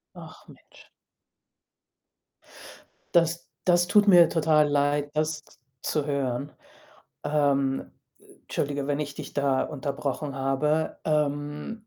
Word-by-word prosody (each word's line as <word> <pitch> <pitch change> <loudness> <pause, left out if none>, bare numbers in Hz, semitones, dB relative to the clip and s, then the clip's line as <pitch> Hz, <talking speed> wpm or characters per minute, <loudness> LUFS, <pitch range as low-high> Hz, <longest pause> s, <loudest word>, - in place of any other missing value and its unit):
Ach, - - -13
Mensch. - - -18 2.3
Das 170 0 +2 0.2
das 175 -1 +3
tut 205 +3 +4
mir 175 -3 +8
total 155 -2 +3
leid, 145 0 +1
das 155 0 -1 0.4
zu 150 -2 -1
hören. 140 -1 -2 0.7
Ähm, 140 -2 0 0.5
entschuldige, 140 -1 -3
wenn 145 0 0
ich 145 -2 -4
dich - - -9
da 140 -2 +1
unterbrochen 140 0 -4
habe, 145 +4 0
ähm. 150 +7 -2
145 Hz, 100 wpm, -26 LUFS, 140-155 Hz, 2.3 s, mir